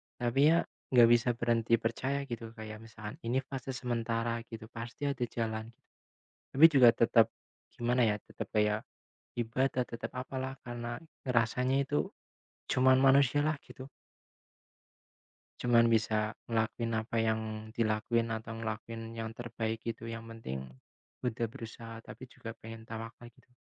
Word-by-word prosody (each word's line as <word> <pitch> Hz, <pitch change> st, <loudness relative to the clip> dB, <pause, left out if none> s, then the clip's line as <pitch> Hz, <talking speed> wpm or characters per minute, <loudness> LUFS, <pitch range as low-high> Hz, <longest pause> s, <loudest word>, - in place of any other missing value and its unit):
Tapi 120 Hz, +2 st, 0 dB, 0.2 s
ya, 170 Hz, -, +3 dB, 0.3 s
nggak 120 Hz, -1 st, +9 dB
bisa 120 Hz, +1 st, +5 dB
berhenti 115 Hz, -1 st, +2 dB
percaya, 130 Hz, +5 st, -1 dB
gitu. 115 Hz, -1 st, -5 dB
Kayak 110 Hz, -1 st, -7 dB
misalkan, 110 Hz, +2 st, -9 dB
"Ini 125 Hz, +3 st, +1 dB
fase 135 Hz, -1 st, -4 dB
sementara," 115 Hz, -2 st, -1 dB
gitu 110 Hz, -1 st, -9 dB
"pasti 120 Hz, +4 st, -7 dB
ada 135 Hz, -3 st, -1 dB
jalan." 110 Hz, -1 st, -3 dB
Gitu. -, -, -39 dB, 0.7 s
Tapi 140 Hz, +4 st, +6 dB
juga 135 Hz, -6 st, +7 dB
tetep 115 Hz, -1 st, +5 dB, 0.5 s
gimana, 120 Hz, +1 st, +1 dB
ya, 105 Hz, -2 st, +2 dB
tetep -, -, -8 dB
kayak 105 Hz, 0 st, +2 dB, 0.5 s
ibadah, 125 Hz, +2 st, +1 dB
tetep 115 Hz, 0 st, -6 dB
apalah, 130 Hz, +1 st, -4 dB
karena 120 Hz, -1 st, -4 dB, 0.3 s
rasanya 125 Hz, +3 st, +2 dB
itu 145 Hz, +2 st, 0 dB, 0.6 s
cuman 130 Hz, +1 st, +5 dB
manusialah, 140 Hz, +3 st, +4 dB
gitu. 130 Hz, +1 st, -10 dB, 1.7 s
Cuman 115 Hz, -1 st, +5 dB
bisa 110 Hz, -1 st, +1 dB
ngelakuin 115 Hz, 0 st, -1 dB
apa 110 Hz, +1 st, -1 dB
yang 110 Hz, 0 st, +2 dB, 0.3 s
dilakuin, 115 Hz, +1 st, +1 dB
atau 110 Hz, 0 st, -4 dB
ngelakuin 115 Hz, +1 st, -5 dB
yang 115 Hz, 0 st, -4 dB
terbaik 115 Hz, -1 st, -3 dB
gitu 115 Hz, 0 st, -5 dB
yang 115 Hz, 0 st, -6 dB
penting 65 Hz, -, -6 dB, 0.6 s
udah 115 Hz, -1 st, -1 dB
berusaha, 115 Hz, -1 st, -8 dB
tapi 130 Hz, -, -10 dB
juga 115 Hz, -2 st, -8 dB
pengen 115 Hz, 0 st, -9 dB
tawakal 115 Hz, +1 st, -7 dB
gitu. -, -, -26 dB
115 Hz, 135 wpm, -32 LUFS, 115-125 Hz, 1.7 s, nggak